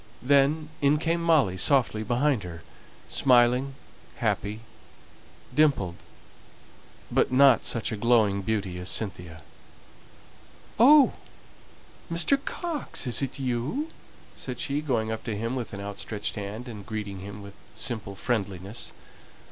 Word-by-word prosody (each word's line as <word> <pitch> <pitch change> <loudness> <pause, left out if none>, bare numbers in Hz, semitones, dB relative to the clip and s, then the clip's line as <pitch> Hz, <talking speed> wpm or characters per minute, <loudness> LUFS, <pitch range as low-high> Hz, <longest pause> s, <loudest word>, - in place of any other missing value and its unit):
Then 145 +3 +3
in 145 +1 +4
came 165 +2 0
Molly 155 - +3
softly 115 +1 +2
behind 120 +3 +1
her, 85 -2 -9 0.4
smiling, 125 +1 +3 0.4
happy, 105 +2 -2 0.9
dimpled; 140 - +2 1.2
but - - +2
not 130 -2 +5
such 115 -3 0
a 110 - -3
glowing 110 -3 +3
beauty 95 -3 -2
as 90 - -4
Cynthia. 90 -6 -2 1.4
"Oh, 280 +3 +7 1.0
Mr. 270 +12 +2
Coxe, 335 - -3
is 125 +1 0
it 135 -2 -3
you?" 135 - -2 0.4
said 125 -2 -6
she, 145 +1 -1
going 115 -7 -1
up 110 - -4
to 110 -3 -3
him 115 +4 -2
with 125 -3 -4
an 100 - -6
outstretched 100 +1 -5
hand, 105 +4 -6
and 105 -4 -8
greeting 105 -2 -5
him 100 +2 -9
with 100 0 -11 0.2
simple 110 -3 -2
friendliness. 100 0 -3
115 Hz, 125 wpm, -27 LUFS, 100-140 Hz, 1.4 s, Oh